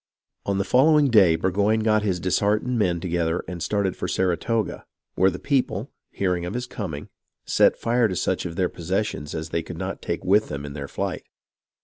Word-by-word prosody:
On 100 -1 +1
the 100 - +1
following 145 +4 +4
day 95 -7 +6
Burgoyne 100 +6 +1
got 110 -1 +3
his 95 -4 -1
disheartened 105 +7 +1
men 90 -5 +1
together 85 -1 -1
and 90 -2 -6
started 100 -1 0
for - - -4
Saratoga, 95 +5 -1 0.3
where 95 +1 +4
the 90 - -5
people, 135 +2 -1 0.2
hearing 90 -3 -1
of 90 +5 -4
his 125 0 -2
coming, 85 - -6 0.4
set - - +3
fire 120 0 +2
to 95 - -3
such 90 - -1
of 85 - -8
their 90 0 +1
possessions 90 -4 -3
as 80 0 -4
they 85 - -1
could - - -8
not - - -4
take - - -3
with 105 +3 +4
them 70 0 -5
in 70 - -7
their 70 -1 -6
flight. - - -4
95 Hz, 195 wpm, -24 LUFS, 85-110 Hz, 0.4 s, day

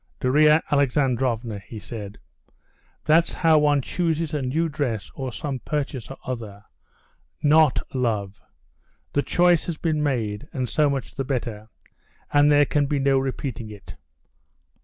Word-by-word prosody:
"Darya 150 +4 +4
Alexandrovna," 125 -5 +1
he 100 +4 -11
said, 105 -1 -8 0.9
"that's 160 +2 +4
how 160 -2 +4
one 145 -2 +2
chooses 165 -1 -1
a 150 - -1
new 150 +6 0
dress 125 -10 -3
or 130 -2 -5
some 140 +1 -4
purchase 135 -1 -4
or 135 - -8
other, 110 -5 -6 0.8
not 150 -2 +5 0.2
love. 105 -6 -1 0.7
The 145 - +2
choice 175 +1 +3
has 170 -3 -3
been 155 -2 -1
made, 115 -5 -2
and 130 -5 -2
so 150 +4 +2
much 135 -3 -3
the 135 - -3
better.... 115 -5 -4 0.6
And 145 0 +5
there 145 0 +5
can 145 0 +1
be 145 - 0
no 135 -1 +3
repeating 130 -3 -4
it." 105 -3 -11
135 Hz, 140 wpm, -24 LUFS, 115-150 Hz, 0.9 s, not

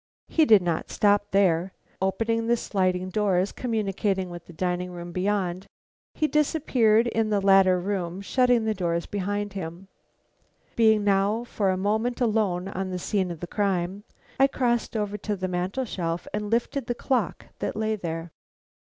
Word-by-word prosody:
He 320 - +4
did 215 -8 +6
not 170 -2 -2
stop 205 0 +2
there. 185 -2 +2 0.3
Opening 225 +4 0
the 235 0 +3
sliding 185 -3 -1
doors 195 -2 +1
communicating 195 -5 -1
with 175 -1 -9
the - - -11
dining 180 +1 -2
room 175 -1 -8
beyond, 185 0 -1 0.5
he 310 - +1
disappeared 265 -8 +3
in 225 -2 0
the 205 -1 +2
latter 195 -2 +5
room, 180 -1 -3
shutting 245 +1 +2
the 220 - +1
doors 170 -3 -1
behind 205 +1 -3
him. 185 0 -7 0.9
Being 220 -2 +4
now 200 0 +3
alone 235 +2 -5
for 205 -4 -1
a 185 - +1
moment 220 +5 0
on 195 -5 0
the 185 - -3
scene 190 0 -1
of 170 -1 -7
crime, 195 -1 -1 0.4
I 270 - +7
crossed 240 -4 0
over 210 -1 -2
to 210 +1 -2
the 185 -1 -3
mantel 185 +8 -2
shelf, 170 -5 -3
and 210 0 -2
lifted 235 +3 -1
the 240 - -1
clock 250 -3 -1
that - - -3
lay 220 0 0
there. 165 -3 -5
200 Hz, 160 wpm, -26 LUFS, 180-220 Hz, 0.9 s, I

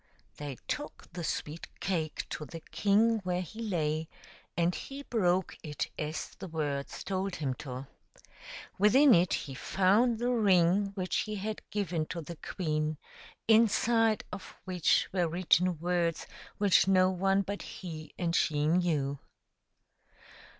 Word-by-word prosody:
They 145 -3 -6
took 295 - -4
the 175 0 -5
sweet 155 +1 -3
cake 165 -5 -2
to - - -4
the 165 +2 -9
king 220 +3 +3
where 180 -2 -2
he 220 +6 -9
lay, 160 -6 -1 0.5
and 170 +1 +2
he 275 +8 -7
broke 185 -7 +1
it 150 -3 -3
as 155 +1 -4
the 190 - -6
words 145 -4 -3
told 190 0 -2
him 140 -4 -1
to. 130 0 -6 0.9
Within 255 +7 +7
it 175 +1 +4
he 135 - -5
found 205 - +2
the 240 +2 0
ring 195 -4 +4
which 185 -2 -1
he 215 -1 -2
had 215 +2 -4
given 180 -6 -1
to 175 - -5
the 165 +1 -8
queen, 155 -4 -2 0.5
inside 225 0 +4
of 195 - -8
which 180 -3 +2
were 180 -3 +2
written 180 +1 +2
words 170 0 0 0.3
which 200 -2 +4
no 185 -1 +5
one 195 +2 +2
but 200 +1 -4
he 160 -4 -8
and 170 -2 0
she 150 -4 +2
knew. 155 -5 +1
180 Hz, 140 wpm, -31 LUFS, 160-200 Hz, 0.9 s, Within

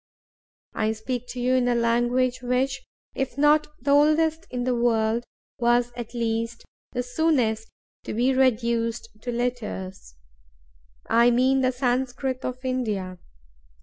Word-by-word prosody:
I 215 0 0
speak 245 +2 -4
to 245 +1 -6
you 250 +1 +1
in 255 -1 +2
a 245 - +2
language 240 +2 +1
which, 260 +2 0 0.3
if 265 -1 -3
not 295 +1 +4
the 280 +3 -1
oldest 310 +3 +3
in 250 -1 -3
the 255 0 +1
world, 235 -1 +1 0.3
was 240 0 +2
at 240 0 -7
least 230 0 -2 0.3
the 245 -1 -2
soonest 245 -5 0 0.4
to - - -4
be 250 +4 +2
reduced 235 -2 +1
to 245 - -4
letters—I - - -3
mean 260 +2 +3
the 255 0 +2
Sanscrit 255 +1 -1
of 255 +1 -5
India. 210 -8 -2
245 Hz, 130 wpm, -25 LUFS, 225-255 Hz, 0.4 s, not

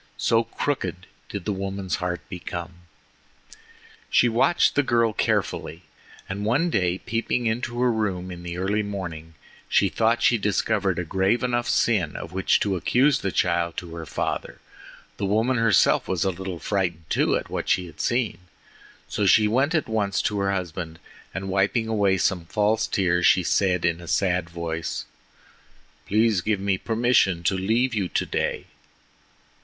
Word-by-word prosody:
So 115 0 +2
crooked 95 - -3 0.2
did 100 -4 -6
the 105 - 0
woman's 95 -1 -3
heart 90 -4 -4
become. 85 -2 -6 1.4
She 120 - +4
watched 130 +8 +3
the 145 - +3
girl 115 -4 +2
carefully, 85 -3 -1 0.4
and 100 +2 -4
one 140 +11 +1
day 90 - +1
peeping 115 +3 -2
into 120 +1 -2
her 125 -1 +3
room 95 -5 -2
in 85 -1 -8
the 85 0 -6
early 100 +3 0
morning, 85 -6 -6 0.3
she - - +3
thought 115 +1 +1
she 120 - +4
discovered 100 -2 0
a 90 - -1
grave 95 +7 +1
enough 120 -1 0
sin 105 -7 +1
of - - -7
which 95 0 +2
to 100 -2 +1
accuse 125 - +3
the 100 - -2
child 85 -1 0
to 85 -2 -6
her 85 -2 -7
father. - - -3 0.6
The 100 - -1
woman 115 +6 +1
herself 115 -3 +3
was 90 -3 0
a 95 - +1
little 95 0 -6
frightened 85 -4 -2
too - - +2
at - - -7
what - - -3
she 90 - +2
had 85 -3 -9
seen. 120 -7 0 0.7
So 105 - 0
she 105 +2 +5
went 135 +9 +1
at 155 - +1
once 105 -3 0
to 105 -1 0
her 100 0 +1
husband, 85 -3 -4 0.3
and 95 +1 -5
wiping 100 +4 +1
away 100 -4 +2
some 90 -2 0
false 105 +4 +1
tears 90 -2 +2
she 90 - +4
said 90 0 +1
in 85 0 0
a 85 - -11
sad 90 -1 +1
voice: 85 -1 -4 1.0
"Please 110 -2 +2
give 105 +1 0
me 95 -1 0
permission 115 -7 +2
to 90 - +2
leave 115 +7 +1
you 100 -4 0
today." - - -1
100 Hz, 165 wpm, -24 LUFS, 90-110 Hz, 1.4 s, she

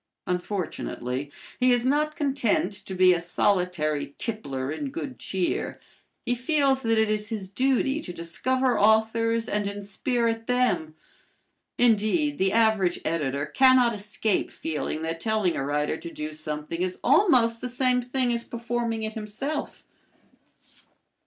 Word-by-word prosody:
Unfortunately 160 -7 -3 0.3
he 255 0 +4
is 245 0 +2
not 300 +3 +1
content 265 - 0
to 190 -1 -8
be 185 0 +6
a 175 - 0
solitary 170 -5 0
tippler 140 - -3
in 275 - -4
good 280 -3 -6
cheer. 185 -2 -2 0.5
He 245 - +1
feels 270 +1 +2
that 225 -2 +1
it 220 0 +3
is 210 0 -2
his 210 -4 -4
duty 265 +6 +1
to 180 - -6
discover 245 +9 0
authors 225 +2 +3
and 210 -1 -1
inspirit 225 +3 -2
them. 210 -11 +1 0.8
Indeed, 245 +6 +2
the 190 0 +2
average 220 -5 +2
editor 145 -3 -1
cannot 255 - +5
escape 210 0 -1
feeling 155 0 -4
that 165 0 -3
telling 215 -3 0
a - - -2
writer 150 +2 -1
to 170 - -8
do 155 -1 -5
something 155 +2 -4
is 185 0 -1
almost 250 - +4
the 250 - -3
same 250 0 +1
thing 250 0 0
as 235 0 -2
performing 235 -1 -3
it 220 0 -3
himself. 225 +8 -5
220 Hz, 140 wpm, -26 LUFS, 175-250 Hz, 0.8 s, be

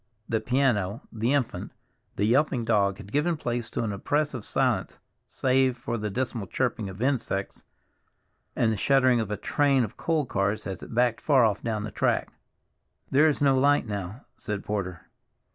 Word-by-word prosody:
The 110 -1 0
piano, 120 -4 +1
the 115 +3 -1
infant, 140 -4 -1 0.4
the 100 - +1
yelping 125 0 +2
dog 100 -3 +2
had 100 0 -11
given 155 +5 +1
place 120 -4 -3
to - - -2
an 105 -3 -2
oppressive 140 +3 -1
silence - - 0 0.3
save 130 -1 +1
for 120 -1 -4
the 105 -2 -3
dismal 115 -2 -3
chirping 115 -2 -1
of 95 +5 -6
insects 125 -8 -2 0.9
and 115 - +2
the 110 - -1
shuddering 130 +1 +3
of 110 -3 -2
a 105 - -2
train 140 +3 +2
of 110 - -6
coal 160 -3 0
cars 100 -2 -1
as 95 -2 -5
it - - -9
backed 120 -1 +2
far 135 -6 +4
off 105 -2 0
down 110 -2 -2
the 105 - -5
track. - - 0 0.8
"There 145 +4 +5
is 145 -1 +1
no 135 -1 +5
light 140 +1 +3
now," 100 +3 -5
said 105 -1 -4
Porter. 90 -5 -3
120 Hz, 175 wpm, -27 LUFS, 105-135 Hz, 0.9 s, There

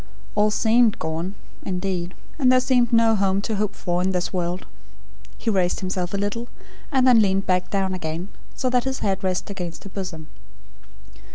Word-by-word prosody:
All 210 0 +3
seemed 225 +1 +3
gone 165 +5 -3 0.3
indeed; 180 -1 -3 0.2
and 255 -3 +5
there 255 - +6
seemed 250 -2 +2
no 230 -1 +5
home 195 -1 +2
to 220 -2 -2
hope 210 -1 -1
for, 175 -1 -1
in 190 +1 +1
this 180 +1 -1
world." 180 0 -2 0.7
He 230 - -1
raised 185 -3 +1
himself 185 -1 -2
a - - 0
little, 205 +4 -2 0.4
and 265 -3 +3
then 245 -3 +7
leaned 195 -1 +2
back 180 -1 +1
again; 185 -3 -2 0.3
so 255 - -1
that 250 0 +2
his 265 0 -2
head 195 -1 0
rested 185 +1 -1
against 175 -4 -6
her 200 - -10
bosom. 180 -5 -5
195 Hz, 175 wpm, -23 LUFS, 180-225 Hz, 0.7 s, then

